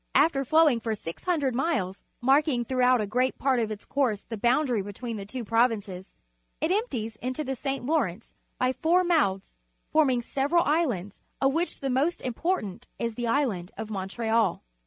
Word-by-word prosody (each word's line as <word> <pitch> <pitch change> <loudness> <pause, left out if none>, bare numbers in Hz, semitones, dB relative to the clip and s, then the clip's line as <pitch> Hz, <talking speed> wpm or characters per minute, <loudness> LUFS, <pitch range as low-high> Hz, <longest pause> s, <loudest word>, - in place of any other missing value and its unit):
\fter 275 -4 +4
flowing 305 -2 +4
for 225 -1 -2
GOO 275 - -2
miles, 240 - -1 0.2
mark 275 +5 +4
ing 245 -5 0
throughout 255 0 +3
a - - 0
great 250 +5 0
part 265 -2 +2
of 225 -2 0
its 210 -1 -7
course 245 -8 0
the 230 - -7
boundary 240 +1 +2
between 215 +4 -6
the 195 -1 -7
two 245 +1 -5
provinces, 215 -5 0 0.4
^it 315 +3 0
empties 240 - -1
into 255 +6 -3
the 270 -2 -3
St. 270 0 -3
Lawrence 235 - -1 0.3
b - - +2
y - - +3
f 260 - -6
ou 325 +2 +3
r 365 +1 +5
jnouths,^ 295 - +2 0.5
forming 265 -6 +3
several 290 +8 +1
islands^Jof^wTiich 275 - -1
the 270 -1 -1
most 285 +7 +1
uhportant 250 - -2
is 230 -1 -2
the 240 +1 -3
Island 230 -9 0
of 220 -1 -5
Montreal. 215 +1 0
250 Hz, 175 wpm, -27 LUFS, 220-285 Hz, 0.5 s, r